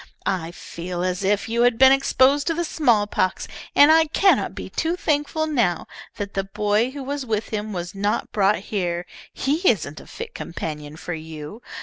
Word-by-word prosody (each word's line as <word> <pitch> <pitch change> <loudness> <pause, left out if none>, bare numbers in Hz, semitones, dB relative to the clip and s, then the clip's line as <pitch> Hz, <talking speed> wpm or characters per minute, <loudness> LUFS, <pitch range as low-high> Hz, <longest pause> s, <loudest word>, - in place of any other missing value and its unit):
I 180 -4 -1
feel 175 +1 -6
as 185 +1 -1
if 200 +1 +1
you 230 +1 0
had 240 -1 +4
been 265 +1 +8
exposed 275 +1 +3
to 330 - +1
the 345 - 0
smallpox, 210 - +1 0.3
and 290 +2 +8
I 320 0 +6
cannot 385 +5 +2
be - - -6
too 330 +2 -1
thankful 310 -1 0
now 240 - 0 0.3
that 200 -1 -5
the 195 - -1
boy 210 +4 0
who 275 +1 -7
was 285 +1 -3
with 220 -3 -2
him 215 0 -3
was 175 -3 -5
not 205 +3 -1
brought 205 0 +3 0.2
here. 175 -3 -1 0.3
He 280 +3 0
isn't 155 -8 -1
a - - -14
fit 465 +1 -8
companion 150 -3 -6
for 175 - -5
you. 160 +5 -8
210 Hz, 185 wpm, -23 LUFS, 180-275 Hz, 0.3 s, been